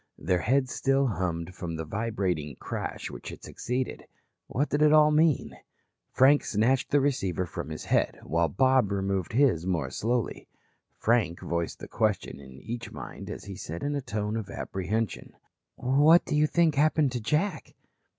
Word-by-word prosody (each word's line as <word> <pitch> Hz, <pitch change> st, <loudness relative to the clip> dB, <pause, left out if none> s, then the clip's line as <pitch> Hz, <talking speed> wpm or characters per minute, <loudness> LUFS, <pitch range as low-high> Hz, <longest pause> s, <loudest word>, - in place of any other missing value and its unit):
Their 90 Hz, -1 st, 0 dB
heads 130 Hz, +2 st, +1 dB
still 135 Hz, 0 st, +2 dB
hummed 90 Hz, -5 st, -2 dB
from 85 Hz, -3 st, -5 dB
the 80 Hz, 0 st, -4 dB
vibrating 90 Hz, -, -2 dB
crash -, -, -5 dB
which -, -, -8 dB
had -, -, -10 dB
succeeded. 125 Hz, +1 st, -4 dB, 0.4 s
What 145 Hz, +5 st, -1 dB
did 145 Hz, -, 0 dB
it 150 Hz, 0 st, +6 dB
all 150 Hz, 0 st, +6 dB
mean? 155 Hz, -1 st, +2 dB, 0.5 s
Frank 140 Hz, +3 st, +5 dB
snatched 120 Hz, +5 st, +1 dB
the 145 Hz, -, +4 dB
receiver 95 Hz, -, 0 dB
from 80 Hz, -, -6 dB
his 80 Hz, -, -6 dB
head, -, -, +1 dB
while 85 Hz, +3 st, +1 dB
Bob 130 Hz, -, +3 dB
removed 95 Hz, -2 st, -1 dB
his 115 Hz, -, +3 dB
more 90 Hz, -4 st, -1 dB
slowly. 120 Hz, 0 st, -2 dB, 0.5 s
Frank 110 Hz, -7 st, +1 dB
voiced 85 Hz, -1 st, -2 dB
the -, -, -9 dB
question 105 Hz, -8 st, -1 dB
in 65 Hz, -2 st, -12 dB
each 120 Hz, 0 st, -6 dB
mind -, -, -8 dB
as -, -, -6 dB
he 100 Hz, -, -7 dB
said 85 Hz, -1 st, -6 dB
in 145 Hz, +1 st, -1 dB
a 140 Hz, -, -1 dB
tone 105 Hz, -2 st, -3 dB
of 110 Hz, -3 st, -5 dB
apprehension: 100 Hz, +2 st, -3 dB, 0.4 s
"What 145 Hz, +7 st, +4 dB
do -, -, -1 dB
you 150 Hz, +1 st, +4 dB
think 165 Hz, -1 st, +3 dB
happened 150 Hz, -1 st, +3 dB
to 125 Hz, -2 st, -3 dB
Jack?" 155 Hz, -, -1 dB
115 Hz, 170 wpm, -28 LUFS, 90-140 Hz, 0.5 s, it